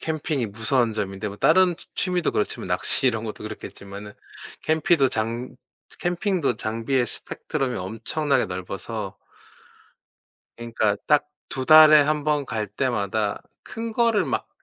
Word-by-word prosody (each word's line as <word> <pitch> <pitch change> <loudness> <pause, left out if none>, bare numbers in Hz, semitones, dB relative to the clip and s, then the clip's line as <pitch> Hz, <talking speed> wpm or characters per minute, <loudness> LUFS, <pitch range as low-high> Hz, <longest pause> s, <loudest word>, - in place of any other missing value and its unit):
캠핑이 155 -5 -2
무서운 115 +3 0
점인데 100 -1 -3
뭐 100 - -8
다른 180 - +4
취 - - -15
취미도 180 -3 0
그렇지만 105 - -2
낚시 135 - +1
이런 115 -3 +1
것도 105 -1 -6
그렇겠지만은 105 -1 -8 0.5
캠핑도 160 -2 +3
장 115 +2 -3 0.4
캠핑도 175 - 0
장비의 115 +3 -1
스펙트럼이 125 +2 -3
엄청나게 120 +8 -1
넓어서 95 +3 -6 1.4
그러니까 115 -3 0
딱 150 -1 +3 0.2
2 130 - -3
달에 155 -1 +9
1 150 0 0
번 150 -2 +1
갈 110 -3 -2
때마다 105 -2 -1 0.2
큰 225 0 -6
거를 230 -2 +2
막 - - -2
125 Hz, 285 characters per minute, -24 LUFS, 110-155 Hz, 1.4 s, 달에